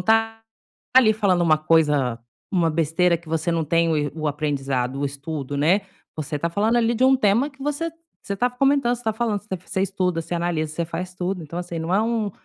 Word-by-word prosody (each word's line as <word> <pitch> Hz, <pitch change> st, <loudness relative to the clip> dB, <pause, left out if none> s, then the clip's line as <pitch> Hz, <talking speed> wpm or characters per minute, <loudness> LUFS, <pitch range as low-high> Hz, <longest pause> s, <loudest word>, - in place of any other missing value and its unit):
está 225 Hz, +3 st, +2 dB, 0.6 s
ali 225 Hz, -4 st, +7 dB
falando 195 Hz, -5 st, +2 dB
uma 155 Hz, -2 st, +4 dB
coisa 150 Hz, -6 st, +2 dB, 0.3 s
uma 175 Hz, -4 st, +2 dB
besteira 165 Hz, +2 st, +2 dB
que 165 Hz, -1 st, -16 dB
você 165 Hz, +2 st, 0 dB
não 165 Hz, -1 st, 0 dB
tem 165 Hz, +2 st, +2 dB
o 155 Hz, -, +2 dB
e 145 Hz, -1 st, -1 dB
o 155 Hz, -1 st, -3 dB
aprendizado, 135 Hz, -3 st, -2 dB
o 145 Hz, -, 0 dB
estudo, 140 Hz, 0 st, -4 dB
né. 170 Hz, +8 st, +3 dB, 0.3 s
Você 150 Hz, -1 st, -3 dB
está 170 Hz, +4 st, -2 dB
falando 215 Hz, +6 st, +1 dB
ali 235 Hz, 0 st, +2 dB
de 250 Hz, +3 st, +2 dB
um 265 Hz, -, +6 dB
tema 235 Hz, +5 st, +2 dB
que 270 Hz, -1 st, -14 dB
você 295 Hz, +3 st, -2 dB, 0.3 s
você 200 Hz, -, -3 dB
estava 245 Hz, +4 st, 0 dB
comentando, 275 Hz, -2 st, +3 dB
você -, -, -12 dB
está 225 Hz, -2 st, -1 dB
falando, 220 Hz, -3 st, -1 dB, 0.3 s
você 190 Hz, -, -2 dB
estuda, 185 Hz, -3 st, 0 dB
você 170 Hz, +2 st, -5 dB
analisa, 170 Hz, -2 st, -1 dB
você 170 Hz, -, -1 dB
faz 175 Hz, +2 st, -5 dB
tudo, 180 Hz, -1 st, -3 dB
então 165 Hz, +3 st, -6 dB
assim, 175 Hz, -1 st, -5 dB
não 165 Hz, +3 st, -1 dB
é 200 Hz, -, +4 dB
um 225 Hz, -2 st, -1 dB
175 Hz, 215 wpm, -23 LUFS, 155-220 Hz, 0.6 s, ali